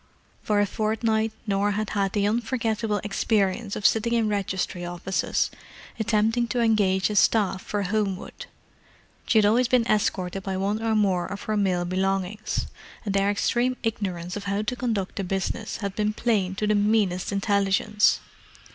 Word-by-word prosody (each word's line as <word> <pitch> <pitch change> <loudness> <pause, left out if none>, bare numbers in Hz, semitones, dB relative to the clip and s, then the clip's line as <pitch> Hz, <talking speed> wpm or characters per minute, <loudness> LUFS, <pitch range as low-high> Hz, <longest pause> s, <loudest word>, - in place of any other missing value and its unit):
For 210 -1 +1
a 205 - +4
fortnight 220 +1 0
Norah 200 0 +1
had 215 +1 -2
had 195 -2 0
the 205 -1 +1
unforgettable 225 -2 -1
experience 205 0 0
of 205 - -5
sitting 230 +1 +3
in 230 -2 +2
registry 190 -3 -2
offices, 175 +2 -1 0.5
attempting 225 +2 +1
to 245 - -1
engage 210 -4 +2
a - - -3
staff 200 -2 +3
for 205 0 -2
Homewood. 195 -1 -3 0.8
She 225 - +3
had 215 - +5
always 235 +4 +4
been 240 -1 +3
escorted 195 -4 0
by 190 0 -3
one 200 +3 -1
or 225 -1 +1
more 190 -4 +2
of 200 +2 -6
her 215 - -1
male 185 -4 +1
belongings, 195 +3 -1 0.4
and 200 - -1
their 195 0 +2
extreme 245 +5 +1
ignorance 185 -6 -3
of 205 -1 -6
how 200 +1 -1
to 230 +4 -2
conduct 225 -7 -2
the 200 - -1
business 195 +4 -3
had 200 -2 -4
been 210 0 0
plain 205 -5 0
to 210 - -1
the 210 - +2
meanest 205 -3 +1
intelligence. 200 +1 +2
205 Hz, 165 wpm, -25 LUFS, 195-220 Hz, 0.8 s, had